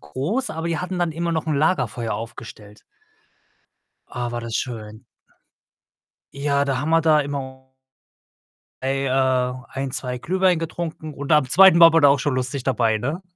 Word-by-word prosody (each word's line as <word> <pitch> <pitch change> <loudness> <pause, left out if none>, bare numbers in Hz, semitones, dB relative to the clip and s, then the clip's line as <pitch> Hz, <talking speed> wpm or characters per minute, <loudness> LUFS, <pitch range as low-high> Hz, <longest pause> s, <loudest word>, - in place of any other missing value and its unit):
groß, 155 - -3
aber 160 +1 -4
die 165 - -1
hatten 180 0 -4
immer 170 +1 -2
noch 160 0 -2
'n 155 - 0
Lagerfeuer 140 -6 0
aufgestellt. 110 -2 -10 1.3
Ah, 120 -1 -4
war 120 - -4
das 115 -1 -6
schön. 110 -1 -6 1.3
Ja, 140 0 0
da 135 -2 -1
haben 150 +4 -2
wir 165 0 +4
da 155 -2 +4
immer 130 -2 -7 1.1
ei 135 +1 -1
äh, 130 -1 +1
ein, 135 0 -4
2 125 0 -4
Glühwein 185 +4 +1
getrunken 160 -1 -6
und 145 +2 -7
am 150 -3 +4
2. 190 -1 +7
war 165 - +9
man 165 0 +3
da 145 - +6
auch 140 - +3
schon 140 +1 -1
lustig 130 +1 -3
dabei, 120 -4 +1
ne? 145 - -4
140 Hz, 160 wpm, -22 LUFS, 125-160 Hz, 1.3 s, war